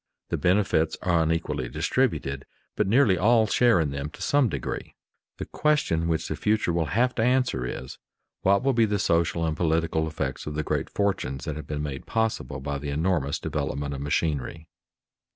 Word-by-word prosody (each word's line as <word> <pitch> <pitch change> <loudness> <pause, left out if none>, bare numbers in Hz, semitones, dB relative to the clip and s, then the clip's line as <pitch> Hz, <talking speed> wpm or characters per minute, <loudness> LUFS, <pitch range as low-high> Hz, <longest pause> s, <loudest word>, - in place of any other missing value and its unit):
The - - -1
benefits 90 -4 +2
are 85 -2 +3
unequally 75 -5 -1
distributed, 70 +2 -1 0.3
but 105 - +1
nearly 110 -4 +4
all 110 +3 +4
share 115 -1 +4
in 75 -3 0
them 70 +1 -4
to - - -12
some 145 -4 +3
degree. 70 -7 -5 0.4
The - - -5
question 145 - +1
which 80 -1 -1
the - - -3
future 105 -5 +1
will 85 -2 0
have 125 +1 +3
to - - -1
answer 125 - +1
is, 65 +2 -7 0.4
What 100 +4 +3
will 135 0 +2
be 115 -2 +4
the 105 -1 0
social 85 -2 +1
and 80 -1 -1
political 80 -1 +1
effects 80 -1 -4
of 75 - -4
the 75 - -1
great - - -2
fortunes 70 -10 -1
that 75 - -3
have 75 -2 -7
been 75 0 -3
made 70 -3 -5
possible 110 -1 -1
by 70 +1 -3
the 75 0 -5
enormous 75 -1 0
development 70 0 -3
of 70 - -5
machinery? 75 +2 -2
80 Hz, 185 wpm, -26 LUFS, 75-105 Hz, 0.4 s, nearly